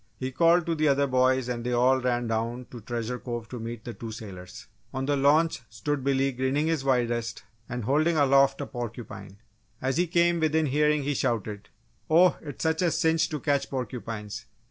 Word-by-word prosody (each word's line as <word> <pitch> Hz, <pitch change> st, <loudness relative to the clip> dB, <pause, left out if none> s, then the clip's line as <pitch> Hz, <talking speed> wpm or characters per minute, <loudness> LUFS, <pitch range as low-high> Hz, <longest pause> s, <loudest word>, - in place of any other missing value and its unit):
He 130 Hz, 0 st, -4 dB
called 170 Hz, +4 st, +4 dB
to 170 Hz, -, 0 dB
the 155 Hz, -1 st, +1 dB
other 140 Hz, 0 st, +3 dB
boys 130 Hz, -1 st, +2 dB
and 120 Hz, -1 st, -3 dB
they 125 Hz, +1 st, -1 dB
all 130 Hz, +2 st, +3 dB
ran 120 Hz, -1 st, 0 dB
down 115 Hz, +2 st, -2 dB
to 120 Hz, -, -9 dB
Treasure 120 Hz, +2 st, -4 dB
Cove 120 Hz, -2 st, -5 dB
to 125 Hz, -, -6 dB
meet 115 Hz, 0 st, -6 dB
the 120 Hz, -, -5 dB
two 115 Hz, -1 st, -7 dB
sailors. 95 Hz, -5 st, -9 dB, 0.3 s
On 130 Hz, 0 st, -1 dB
the 145 Hz, +1 st, +1 dB
launch 145 Hz, +2 st, +3 dB
stood 135 Hz, +6 st, -3 dB
Billy 135 Hz, 0 st, +2 dB
grinning 130 Hz, +4 st, 0 dB
his 160 Hz, -4 st, 0 dB
widest 120 Hz, -3 st, 0 dB, 0.3 s
and 125 Hz, -1 st, -4 dB
holding 155 Hz, +7 st, +2 dB
aloft 140 Hz, -1 st, +4 dB
a -, -, -2 dB
porcupine. 120 Hz, -5 st, -7 dB, 0.4 s
As 130 Hz, 0 st, -1 dB
he 175 Hz, +1 st, +2 dB
came 170 Hz, 0 st, +2 dB
within 160 Hz, 0 st, +2 dB
hearing 150 Hz, +1 st, +2 dB
he 145 Hz, +1 st, 0 dB
shouted: 105 Hz, -5 st, -2 dB, 0.4 s
"Oh, 175 Hz, +3 st, +5 dB
it's 145 Hz, 0 st, -6 dB
a 160 Hz, +2 st, +2 dB
cinch 160 Hz, 0 st, +2 dB
to 150 Hz, -, -3 dB
catch 140 Hz, +1 st, 0 dB
porcupines! 115 Hz, -5 st, -5 dB
130 Hz, 190 wpm, -27 LUFS, 120-150 Hz, 0.4 s, Oh